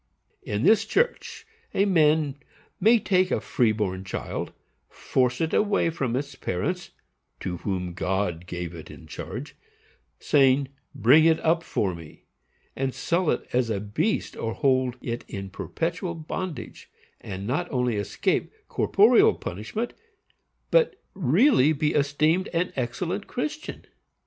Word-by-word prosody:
In 105 +2 -3
this 220 -1 +5
church 470 - -1 0.3
a 195 - +4
man 155 -6 +3 0.4
may 225 +5 +6
take 185 -3 +2
a - - +1
free 120 -4 +1
born 95 -3 -2
child, 95 - -4 0.4
force 125 -1 0
it 160 - -1
away 205 -5 +2
from 135 -7 -2
its 140 +2 -3
parents, 175 - -3 0.5
to 90 -1 -3
whom 90 -2 -3
God 90 -2 -2
gave 90 -1 -5
it 80 -2 -10
in - - -12
charge, - - -7 0.6
saying 135 -1 +3 0.3
"Bring 145 +7 +6
it 160 -1 +4
up 165 +1 +2
for 100 - -1
me," 80 -3 -12 0.5
and 135 -1 -2
sell 170 -1 0
it - - -1
as 125 -1 +2
a 105 -3 -1
beast 105 - -1
or 115 0 -3
hold 130 -3 +1
it 120 0 -3
in 95 -1 -6
perpetual 170 - -3
bondage, 165 +1 -6 0.3
and 95 0 -6
not 150 +10 -1
only 125 -4 0
escape 100 0 -1 0.2
corporeal - - +5
punishment, 110 - -4 0.8
but - - +4 0.2
really 170 - +4
be 150 0 0
esteemed 155 +5 +2
an 170 +2 0
excellent 170 +11 -3
Christian. 305 +5 -5
140 Hz, 135 wpm, -26 LUFS, 105-175 Hz, 0.8 s, may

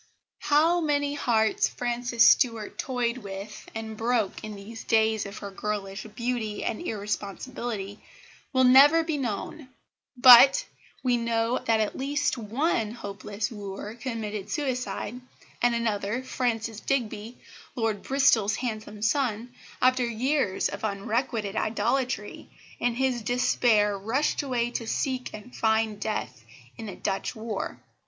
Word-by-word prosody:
How 325 +4 +3
many 285 -1 +1
hearts 225 -6 +2
Frances 240 -1 +2
Stuart 230 -5 +2
toyed 245 -2 -1
with 200 0 -8
and 220 0 -5
broke 225 -2 -1
in 215 -1 -6
these 215 +3 -9
days 220 -2 +2
of 200 - -9
her 200 -1 -7
girlish 200 0 -4
beauty 235 -3 -2
and - - -2
irresponsibility 210 - -4 0.5
will 260 -2 +3
never 280 +6 +7
be 320 -3 -2
known; 255 +4 -4 0.5
but 250 +2 +9 0.4
we 250 -2 +2
know 230 +1 0
that 225 -1 +3
at 215 - -1
least 290 +2 0
one 230 0 -1
hopeless 210 -1 -5
wooer 205 0 -6
committed 220 -4 -5
suicide, 250 -5 -3 0.4
and 240 -1 +3
another, 220 +1 -1
Francis 230 -4 -2
Digby, 230 -3 -2 0.4
Lord 225 -4 -1
Bristol's 245 -7 +3
handsome 215 -3 -5
son, 240 -1 0 0.3
after 255 0 +4
years 240 -2 0
of 200 - -7
unrequited 215 +1 -2
idolatry, 235 -1 -1 0.3
in 240 -1 0
his 255 -1 0
despair 220 -2 +2
rushed 225 +9 0
away 245 -4 -1
to 230 -2 -4
seek 260 +1 -1
and 215 +4 -11
find 220 -1 +1
death 210 - -4 0.3
in 225 - -8
the 195 - -6
Dutch 195 -1 -3
war. 220 -2 -4
230 Hz, 130 wpm, -27 LUFS, 210-255 Hz, 0.5 s, but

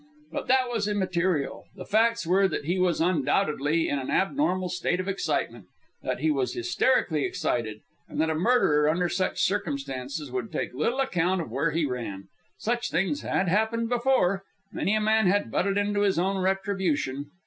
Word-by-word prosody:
But - - -4
that 260 0 +3
was 225 -4 -1
immaterial; 185 -7 -1
the 185 -2 -8
facts 230 +1 +2
were 190 +3 +4
that 155 - -4
he 175 +4 0
was 180 -2 +2
undoubtedly 155 -1 +1
in 145 - -1
an 130 - -5
abnormal 190 -4 +1
state 180 0 -1
of 185 - -3
excitement, 195 0 -2 0.4
that - - -3
he 315 - +2
was 380 +5 -1
hysterically 260 - +1
excited, 110 -3 -2 0.3
and - - -5
that 160 0 +2
a - - +1
murderer 155 -5 +3
under 175 +3 +1
such 185 - 0
circumstances 140 -6 -2
would 125 -3 -4
take - - -3
little 230 - 0
account 180 -7 +1
of 160 -9 -5
where 140 +7 +1
he 160 +1 0
ran. 115 -7 -5 0.3
Such 240 +2 -1
things 165 -4 0
had 190 - 0
happened 220 +5 +1
before. 240 -6 +2 0.3
Many 205 - 0
a - - +2
man 220 -1 +3
had 190 - +1
butted 195 - +1
into 205 0 +1
his 200 -3 +2
own 190 +3 +1
retribution. 185 -8 -1
185 Hz, 175 wpm, -26 LUFS, 150-205 Hz, 0.4 s, were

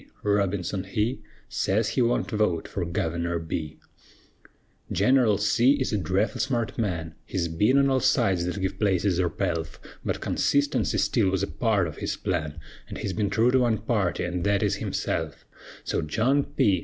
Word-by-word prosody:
Robinson 100 -2 0
he 110 +6 -1 0.3
Sez 105 +3 0
he 125 - 0
wunt 120 +1 +1
vote 105 -6 0
fer - - -3
Guvener 85 0 -1
B. 80 -2 -4 1.1
Gineral 125 -6 +3
C. 115 +6 +4
is 130 -5 -1
a - - +2
dreffle 95 +5 0
smart 120 -4 -1
man: 85 -8 -2
He's 85 -2 -2
ben 105 +11 +2
on 140 0 +4
all 135 -1 +2
sides 120 -9 +2
thet 90 +3 -3
give 95 0 -3
places 95 -3 +1
or 90 -2 +2
pelf; 85 -4 -3 0.2
But - - -2
consistency 145 +1 +1
still 110 -6 +2
wuz 95 0 0
a - - 0
part 110 -6 +1
of 80 -3 -6
his - - -3
plan, 80 -5 -2 0.4
He's 95 - -3
ben 100 +2 0
true 115 +5 +3
to 130 - +4
one 120 -3 +2
party, 105 -11 -1
an' 90 0 -3
thet 100 +1 +1
is - - +1
himself; - - -3 0.4
So - - -1
John 125 - +1
P. 120 -10 +2
100 Hz, 170 wpm, -26 LUFS, 90-120 Hz, 1.1 s, C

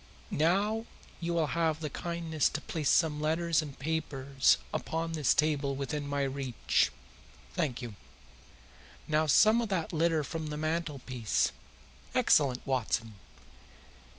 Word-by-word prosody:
Now 205 +8 +1 0.3
you 170 0 -2
will 165 -2 +2
have 160 -2 +1
the 155 -2 -3
kindness 170 -3 -1
to 145 - -4
place 150 -3 -2
some 150 -3 +3
letters 165 +1 +2
and 145 -3 -8
papers 140 -3 +1 0.2
upon 165 +1 -2
this 155 -5 +2
table 145 -2 +1
within 145 +1 -3
my 140 0 0
reach. 135 -2 0 0.6
Thank 130 -4 -2
you. 120 -3 -6 1.1
Now 155 0 +2
some 215 +10 +6
of 230 - -3
that 175 -5 -2
litter 165 -1 +2
from 155 +3 -5
the 150 0 -4
mantelpiece. 140 - -1 0.6
Excellent, 130 -4 +3
Watson! 115 -4 -1
155 Hz, 125 wpm, -30 LUFS, 140-165 Hz, 1.1 s, some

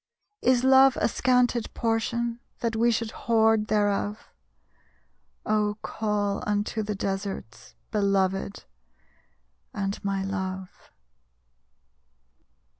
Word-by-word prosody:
_ - - +3
_Is 250 -1 +2
love 265 0 +6
a - - +3
scanted 245 -2 +1
portion, 230 +1 -1 0.2
That 230 -1 -1
we 235 +2 +3
should 230 -1 -1
hoard 220 -2 +2
thereof? 205 0 0 1.1
Oh, 210 -1 +1
call 205 -2 -1
unto 210 +1 -1
the 210 0 -3
deserts, 195 - -5 0.2
Belovèd 195 -1 0 1.1
and 195 +1 -3
my 195 -1 -1
Love! 190 -1 -5
210 Hz, 95 wpm, -26 LUFS, 200-230 Hz, 1.1 s, love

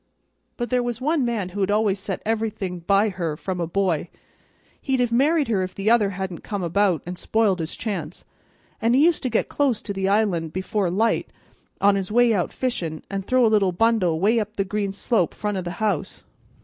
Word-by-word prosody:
But 240 0 -3
there 250 0 +3
was 240 -1 -3
one 295 +2 +1
man 225 -6 -1
who 195 +3 -7
had 190 - +1
always 205 -1 +2
set 195 -1 -5
everything 215 -5 -2
by 200 +5 +2
her 170 -5 -3
from 185 +1 -4
a 170 - -1
boy. 175 -2 0 0.7
He'd 265 -2 0
have 245 -1 +1
married 290 +5 +3
her 210 -5 +1
if 185 0 -4
the 200 +3 +1
other 220 -4 +4
hadn't 190 -3 -5
come 200 -3 -4
about 175 -2 +1
an' 180 +1 -6
spoilt 210 -4 +1
his 160 0 -4
chance, 180 -7 -5 0.6
and 230 +2 +3
he 275 - +5
used 340 -2 +2
to 255 - -1
get 225 - 0
close 270 -6 +1
to 200 - -4
the 195 0 -1
island, 195 -7 +1
before 190 +1 -1
light, 220 +6 +1 0.5
on 200 0 +5
his 195 0 -3
way 240 0 +4
out 185 -4 0
fishin', 170 - -3
and 195 0 -2
throw 255 +4 +3
a 220 - +3
little 200 -3 +3
bundle 185 -5 +2
way 220 +6 +3
up 215 0 -4
the 195 - 0
green 200 0 -2
slope 200 -2 0
front 210 -1 -2
o' 190 - -1
the 175 -1 -5
house. 210 -6 -2
205 Hz, 215 wpm, -23 LUFS, 185-230 Hz, 0.7 s, he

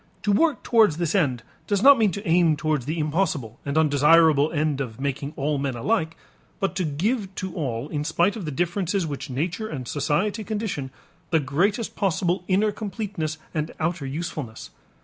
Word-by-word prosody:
To 210 - +2
work 310 +9 +2
towards 220 -10 +4
this 170 -2 -1
end 135 - +1 0.2
does 200 +2 +1
not 280 -2 +8
mean 215 -2 +4
to 200 +2 -6
aim 165 -2 +4
towards 150 -4 -1
the 160 +3 -2
impossible 150 - -1
and 140 +2 -2
undesirable 155 0 +5
end 150 -3 0
of 120 -3 -5
making 140 +1 -3
all 145 +1 -1
men 135 -2 -2
alike, 165 - -1 0.4
but 195 -1 -1
to 185 - +1
give 190 - -1
to 185 -2 -4
all, 130 -5 -3
in 150 -1 -3
spite 170 +5 +1
of 210 -6 -5
the - - -3
differences 175 +4 -1
which 145 0 -5
nature 170 - -2
and 130 - -6
society 190 - 0
condition, 205 -10 -3 0.4
the 160 - +3
greatest 185 - 0
possible 180 -1 0
inner 205 +3 +2
completeness 200 -7 -4 0.2
and 155 0 -2
outer 160 -3 -1
usefulness. 140 -5 -5
160 Hz, 175 wpm, -24 LUFS, 145-195 Hz, 0.4 s, not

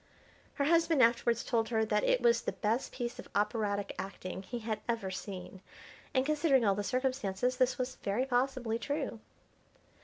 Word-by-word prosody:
Her 285 - 0
husband 330 -3 +4
afterwards 235 0 +3
told 225 -2 0
her 220 -2 +2
that 210 -1 +1
it 250 - +3
was 235 -1 +4
the - - -2
best 225 +4 -1
piece 240 -1 -4
of - - -9
operatic 205 -1 0
acting 190 -1 -5
he 240 +5 -6
had 220 -2 -3
ever 225 -5 -1
seen, 185 0 -7 0.5
and, 260 0 +2
considering 290 -4 +3
all 200 - +4
the 205 +1 -2
circumstances, 255 -1 0
this 255 0 +2
was 255 0 -3
very 210 +6 -1
possibly 245 -3 0
true. 280 -4 -3
235 Hz, 165 wpm, -32 LUFS, 210-260 Hz, 0.5 s, husband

